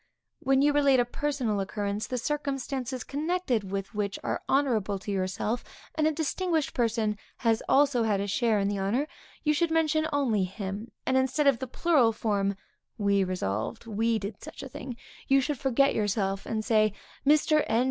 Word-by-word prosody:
When 270 +1 +3
you 290 0 +4
relate 280 -3 +4
a 245 - +3
personal 245 -5 -1
occurrence, 200 +1 -2
the 255 - -2
circumstances 270 -2 -3
connected 285 - -1
with 195 +2 -4
which 205 -1 -2
are - - -2
honorable 230 -8 +2
to 195 +2 -6
yourself, 195 +5 -1 0.3
and 310 0 +2
a - - +3
distinguished 320 0 -1
person 225 -3 0 0.2
had 225 -2 +1
also 275 -4 +4
a 200 -3 +1
share 225 +1 +2
in 200 -1 +1
the 200 -1 -1
honor, 230 +10 0 0.4
you 300 0 +3
should 335 +3 +1
only 310 -8 +1
mention - - +2
him, 205 +3 -5
and 260 - +2
instead 260 +3 +1
of 275 -4 +4
the 260 - -4
plural 260 -5 +3
form, 200 -3 0 0.4
we 200 -2 +2
resolved, 110 - -3
we 225 +1 +1
did 205 0 -6
such - - -9
a 270 - -7
thing, 250 -1 -7 0.3
you 275 0 +5
should 280 0 -1
forget 270 +1 +3
yourself, 195 -2 -1
and 215 -1 -2
say, 215 -2 +3 0.3
_Mr. 305 +1 +4
N. 225 +1 +2
235 Hz, 175 wpm, -28 LUFS, 205-280 Hz, 0.4 s, you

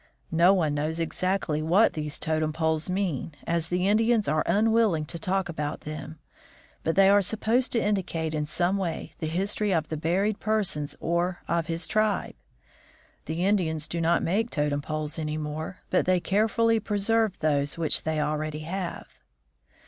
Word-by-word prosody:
No 170 +3 +5
one 165 -7 +2
knows 155 +3 -2
exactly 165 -1 -1
what 180 +8 +4
these 150 -1 -3
totem 155 -1 -1
poles 160 +1 0
mean, 180 -6 -2
as 170 -1 0
the 180 +2 0
Indians 225 +1 +3
are 155 0 +2
unwilling 210 -4 +3
to 170 +2 -6
talk 190 +2 0
about 150 -3 -4
them, 155 +1 -7 0.7
but 165 - 0
they 195 0 +6
are 200 +1 +6
supposed 225 +6 +1
to 235 - +2
indicate 180 -6 -1
in 150 -1 -1
some 175 +5 +1
way 175 -4 -4
the 160 - -2
history 200 +5 0
of 160 -4 0
the 155 - -3
buried 195 +7 0
person 205 -9 0
or 175 +2 -1
of 170 -1 0
his 165 +1 -2
tribe. 215 -1 0 0.9
The 165 +4 -2
Indians 160 -6 +1
do 170 - -3
not 165 +1 +2
make 215 +7 0
totem 145 -4 -1
poles 155 +1 -3
any 155 -1 -2
more, 155 +4 -5
but 180 - +2
they 185 -1 +4
care 205 +5 +2
fully 230 0 +2
preserve 215 0 +1
those 145 -2 +1
which 165 -2 +1
they 160 -1 -1
already 150 0 -2
have. 175 +3 -4
170 Hz, 170 wpm, -27 LUFS, 155-200 Hz, 0.9 s, they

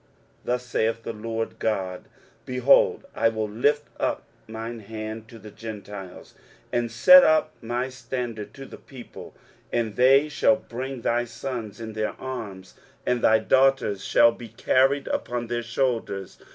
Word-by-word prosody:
23:049:022 - - -36 0.4
Thus 125 0 -1
saith 115 -1 -1
the 115 - -4
Lord 115 +1 -4
GOD, 95 -4 -2 0.4
Behold, 125 +2 +3
I - - +2
will 110 -1 -2
lift 145 +8 +1
up - - -1 0.2
mine 115 +1 -6
hand 110 +1 -7
to 115 - -12
the 105 -1 -12
Gentiles, 100 -4 -9 0.4
and 120 -1 0
set 275 - +8
up 155 0 +3
my 120 +2 -2
standard 120 -4 -5
to 135 -1 -9
the - - -12
people: 130 -3 -12 0.4
and 115 -3 -1
they 135 +5 +5
shall 150 -2 +3
bring 130 0 -6
thy 120 +1 +1
sons 120 -3 -6
in 110 -1 -6
their 110 0 -2
arms, 105 -8 -7 0.3
and 125 -1 +1
thy 110 - +5
daughters 130 -4 +2
shall 115 +3 +5
be 115 0 -10
carried 135 +5 +2
upon 120 -1 -2
their 120 0 -2
shoulders. 115 -5 -2
115 Hz, 150 wpm, -25 LUFS, 110-130 Hz, 0.4 s, set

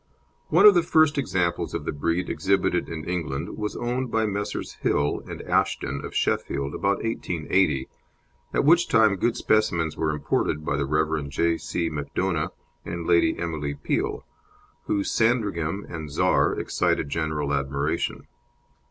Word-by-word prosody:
One - - +5
of 210 - +11
the 175 - +4
first 155 -3 +3
examples 90 -8 -1
of - - -4
the - - -1
breed 85 +5 -1
exhibited 95 -2 0
in 80 -2 -5
England 85 -6 -3
was 105 -1 -4
owned 125 +1 -2
by 110 0 +1
Messrs. 105 0 -4
Hill 75 0 +1
and - - -7
Ashton, 70 +1 0
of - - -7
Sheffield, 70 +1 -1
about 100 0 0
1880, 90 - 0 0.6
at - - +1
which 170 +3 +5
time 110 -3 +4
good 115 +5 0
specimens 85 -8 +1
were 80 - 0
imported 75 0 -1
by 70 - 0
the 70 -1 -1
Rev. 75 -1 0
J. 85 +4 +1
C. 85 -1 -2
Macdona 75 +2 -2 0.3
and 85 -1 -5
Lady 85 -1 +3
Emily 75 -4 -3
Peel, - - -2 0.6
whose 100 -1 0
Sandringham 100 -6 0
and 80 -3 -6
Czar 70 - +2
excited - - 0
general 75 -2 -1
admiration. 70 +2 -1
85 Hz, 145 wpm, -25 LUFS, 75-105 Hz, 0.6 s, of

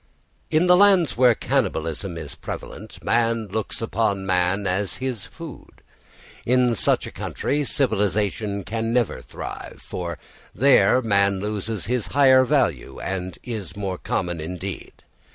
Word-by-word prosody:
In 155 +3 +3
the 180 0 +6
lands 190 -5 +5
where 125 -2 +5
cannibalism 80 +2 -1
is 80 -3 -6
prevalent - - -8
man 115 -2 +1
looks 110 +3 -3
upon 100 -3 0
man 95 +2 +1
as 95 +1 -1
his 130 -6 -4
food. 165 -6 -11 0.6
In 125 0 +3
such 115 - +2
a - - -7
country 145 +1 -2
civilisation 105 - 0
can 115 +2 -2
never 120 -3 0
thrive, - - -8
for 85 -2 -5 0.4
there 130 +2 +5
man 100 -3 +2
loses 105 0 -3
his 120 0 -1
higher 130 -2 +5
value 130 - 0
and 95 -2 -4
is 110 -6 -6
made 95 -3 -4
common 85 -3 -2
indeed. 90 +4 -7
110 Hz, 135 wpm, -23 LUFS, 95-125 Hz, 0.6 s, the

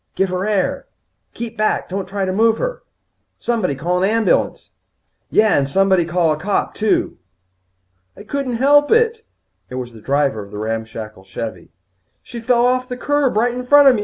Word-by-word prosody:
"Give 195 0 +1
her 185 +2 -2
air!" 200 -4 -1 0.5
"Keep 230 -1 -6
back. 215 - +1
Don't 190 0 -4
try 195 0 -2
to 185 - -2
move 225 +2 +3
her." - - -3 0.6
"Somebody 230 -12 -1
call 175 +6 -1
an 190 - +3
ambulance." 225 -2 0 0.6
"Yeah, 215 -2 +4
and 140 -1 +1
somebody 190 +1 +3
call 170 -1 +1
a 155 - -2
cop, 195 +4 -1
too." 215 -1 0 1.0
"I 205 - -10
couldn't 255 +2 -3
help 290 +4 +4
it." 460 0 +3 0.5
It 125 - -7
was 125 -2 -5
the 110 - -13
driver 140 -3 0
of 100 - -13
the 105 - -8
ramshackle 110 -2 -5
Chevvie. 95 -2 -7 0.5
"She 240 - -8
fell 240 +1 +2
off 255 +1 +1
the 250 - -4
curb 290 -3 +1
right 240 +2 +2
in 250 - -4
front 285 +2 +7
of - - +5
me. - - -1
200 Hz, 185 wpm, -19 LUFS, -, 1.0 s, front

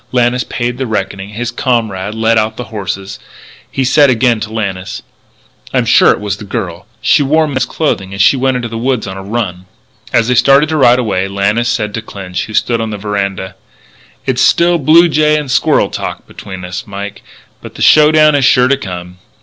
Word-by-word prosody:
Lannis 125 0 +1
paid 120 +1 -4
the 130 - -2
reckoning; 100 -2 -3
his 115 +3 -4
comrade 110 -5 -2
led 110 0 +2
out 110 0 -2
the 125 - -4
horses. 95 -1 -5 0.5
He 135 - -1
said 140 +2 +4
again 120 -2 +2
to 110 0 -5
Lannis: 100 -4 -4 0.7
"I'm - - +2
sure - - +5
it - - +2
was 100 -1 -3
the 105 - -10
girl. 95 -4 -5
She 150 - +3
wore 155 +3 +2
men's 130 -3 -1
clothes 155 -10 -1
and 95 +1 -9
she 95 - +5
went 130 0 0
into 120 -1 -3
the 115 0 -6
woods 125 -1 -1
on 95 -1 -6
a 95 - -7
run." 95 -3 -4 0.4
As 115 - +2
they 125 - +2
started 140 +4 +4
to 160 - -1
ride 125 -3 +5
away, 100 -6 -1
Lannis 105 +4 0
said 105 -3 -2
to 115 - -3
Clinch, 95 -4 -6
who 110 - -7
stood 115 +1 +1
on 110 - -3
the 105 - -5
veranda: 100 -2 -3 0.7
"It's - - 0
still 170 0 +3
blue 160 +4 +5
jay 150 -1 +2
and 145 -4 -4
squirrel - - +2
talk - - -5
between 95 -2 -9
us, 90 0 -6
Mike, 100 0 -7 0.4
but - - -11
the - - -3
show 150 0 +6
down 155 -1 +5
is 145 -2 +2
sure 125 0 +4
to 140 - +3
come. 90 -5 -8
115 Hz, 205 wpm, -13 LUFS, 100-130 Hz, 0.7 s, show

